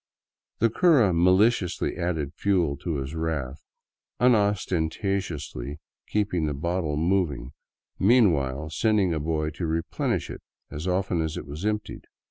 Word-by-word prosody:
The 115 0 +2
cura 135 - +4
maliciously 90 +2 +2
added 80 -4 -2
fuel 90 -8 +1
to 80 +3 -3
his 70 +1 -4
wrath, 80 -4 -3 0.6
unostentatiously 95 - 0 0.3
keeping 95 -6 0
the 75 - -2
bottle 80 0 -1
moving 80 -7 0 0.5
meanwhile, 80 - +3
sending 105 -1 +2
a 80 - -1
boy 75 0 -1
to 85 +2 -4
replenish 80 +1 -2
it - - -8 0.3
as 75 +5 -5
often 90 -2 0
as 80 -1 -3
it - - -6
was 75 +8 -4
emptied. 105 0 -3
85 Hz, 125 wpm, -26 LUFS, 75-100 Hz, 0.6 s, cura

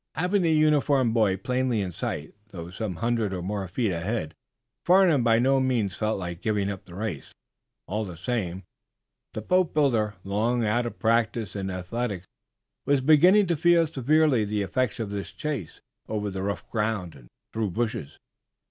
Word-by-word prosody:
Having 180 +5 +1
the 165 -2 +2
uniformed 145 -5 +3
boy 105 -5 +2
plainly 125 +2 0
in 95 -3 -2
sight, 75 -2 -5 0.2
though 85 -4 -8
some 100 -1 -4
hundred 115 0 -1
or 90 -2 -4
more 100 0 -3
feet 105 +4 -1
ahead, 85 -1 -3 0.5
Farnum 175 -7 +5
by 115 -1 +4
no 135 +3 +3
means 120 -8 0
felt 110 +2 -1
like 90 -2 -6
giving 100 -2 0
up 95 - -8
the 85 - -12
race. 100 -8 -5 0.5
All 105 +3 -2
the 90 -5 -8
same, 95 -2 -3 0.7
the 110 - -4
boatbuilder, 140 - +2
long 115 +4 0
out 120 +3 +1
of 110 - -8
practice 115 -3 0
in 95 -1 -3
athletics, 95 +1 -4 0.6
was 140 -1 +2
beginning 175 +9 +6
to 170 -2 0
feel 170 +1 +4
severely 150 -3 +2
the 105 0 -1
effects 125 +4 -1
of 110 -3 -3
this 100 -1 -5
chase 140 - -5 0.3
over 105 -2 -2
rough 100 +1 -3
ground 105 -6 -1
and 65 -3 -16 0.3
through 110 -2 -1
bushes. 105 -7 -3
110 Hz, 165 wpm, -26 LUFS, 95-130 Hz, 0.7 s, beginning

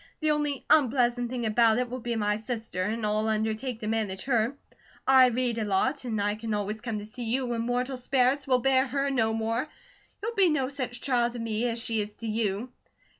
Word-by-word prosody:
The 310 -1 +2
only 295 -2 -1
unpleasant 245 -4 +3
thing 245 -2 -3
about 220 +1 +4
it 250 0 0
will 250 +2 -5
be 240 0 -3
my 210 -1 +1
sister, 220 -4 -4
and 215 +3 -1
I'll 215 +1 +1
undertake 220 +3 -1
to 215 - -4
manage 215 -4 -1
her. 240 0 +1 0.5
I 260 -1 +7
read 245 -1 0
a - - 0
lot, 215 +8 +1
an' 220 -3 -2
I 205 0 +1
can 220 0 -3
always 210 +1 -3
come 230 -3 -3
to 205 - -6
see 235 +3 -7
you 255 +4 0
when 240 -2 -2
mortal 250 +2 -1
sperrits 255 +2 +1
will 255 -2 +3
bear 265 +1 +3
her 275 +1 -1
no 225 -4 +2
more. 225 +5 -1 0.5
She'll 455 +3 -3
be 390 -5 +4
no 275 -4 0
such 255 -4 -4
trial 245 -3 +2
to 240 - -8
me, 230 0 -1
as 230 0 -2
she 225 -2 0
is 210 0 -6
to 230 - -9
you." 215 +2 -1
235 Hz, 220 wpm, -28 LUFS, 220-255 Hz, 0.5 s, I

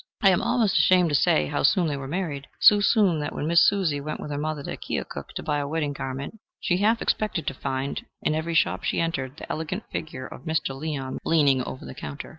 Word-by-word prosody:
I 195 - +7
am 180 - +2
almost 225 -5 +2
ashamed 180 -2 +5
to 145 - +1
say 75 - +3
how - - -2
soon 175 +5 +4
they 150 -3 -1
were 135 -1 -6
married 150 -4 -3
so 210 - +7
soon 200 -5 +3
that 150 - -4
when - - -3
Miss 170 +2 +5
Susan 170 -8 -1
went 155 +1 -4
with 150 - -6
her 145 - -2
mother 155 -1 -3
to - - -4
Keokuk - - -5
to - - -4
buy 150 -1 0
a 140 - -2
wedding 150 -1 -1
garment, 135 +9 -6 0.2
she 175 - +1
half 220 +4 +2
expected 205 -8 -1
to 135 - -1
find, 135 +1 -3 0.2
in - - +1
every 160 +2 -2
shop - - +2
she - - 0
entered, 145 -5 -2
the - - -7
elegant 160 +7 -3
figure 135 -5 -5
of - - -10
Mr. 160 -4 -1
Leon 135 -2 -4
leaning 145 -5 +3
over 130 +1 -6
the - - -8
counter. 140 - -7
155 Hz, 235 wpm, -25 LUFS, 140-175 Hz, 0.2 s, I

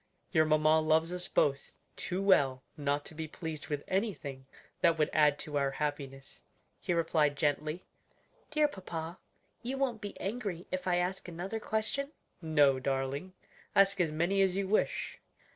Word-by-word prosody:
"Your 160 0 +4
mamma 155 0 +4
loves 160 +2 +2
us 180 0 -4
both 140 -1 +1 0.2
too 185 +2 -3
well 135 -9 +4
not 145 -1 -1
to - - -8
be 160 0 -5
pleased 160 -1 -6
with 145 -2 -3
anything 165 -10 -2 0.3
that 165 - +4
would 150 - +1
add 150 -2 +4
to 145 -1 -2
our 140 -1 +2
happiness," 135 -1 -4 0.4
he - - -3
replied 160 -4 +2
gently. 150 +3 0 0.7
"Dear 305 0 +3
papa, 175 - -6 0.4
you 255 +3 -3
won't 255 -5 -1
be 205 - -7
angry 195 -4 -3
if 185 0 -3
I 180 - +3
ask 180 +2 -1
another 180 +6 -4
question?'"' 220 +8 -2 0.3
"No, 145 -5 +4
darling; 135 +7 -2 0.4
ask 195 -1 +5
as 165 -3 +1
many 175 +6 +1
as 190 -1 +3
you 195 0 0
wish." 215 - 0
160 Hz, 160 wpm, -32 LUFS, 145-190 Hz, 0.7 s, ask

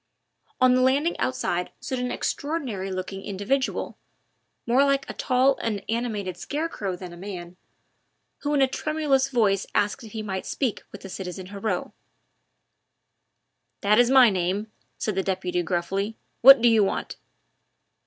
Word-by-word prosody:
On 255 -1 +5
the 255 - +3
landing 280 +6 +2
outside 180 -8 -1
stood 260 - -4
an 250 0 -2
extraordinary 260 - -3
looking 185 +1 -5
individual 205 +8 -2 0.7
more 250 +4 +4
like 275 -1 +1
a - - -5
tall 260 +1 +2
and 210 -3 -2
animated 215 -6 -2
scarecrow 285 - -3
than 180 -1 -9
a - - -11
man 180 -2 -7 0.8
who 295 0 -1
in 275 - +4
a - - +4
tremulous 275 -1 0
voice 210 -6 +2
asked 205 +5 +1
if 220 - -11
he 220 -1 -4
might 190 -2 -4
speak 255 -6 -1
with 205 - -10
the - - -8
citizen 185 0 -6
Heriot. 200 -2 -2 1.9
"That 210 +3 +4
is 245 0 +5
my 255 -4 +7
name," 190 +4 -1 0.3
said 215 - -2
the 190 - 0
deputy 185 -2 -1
gruffly, 190 +5 -2 0.2
"what 270 -1 +9
do - - +7
you 225 -2 +5
want?" 195 - -2
215 Hz, 150 wpm, -25 LUFS, 190-260 Hz, 1.9 s, what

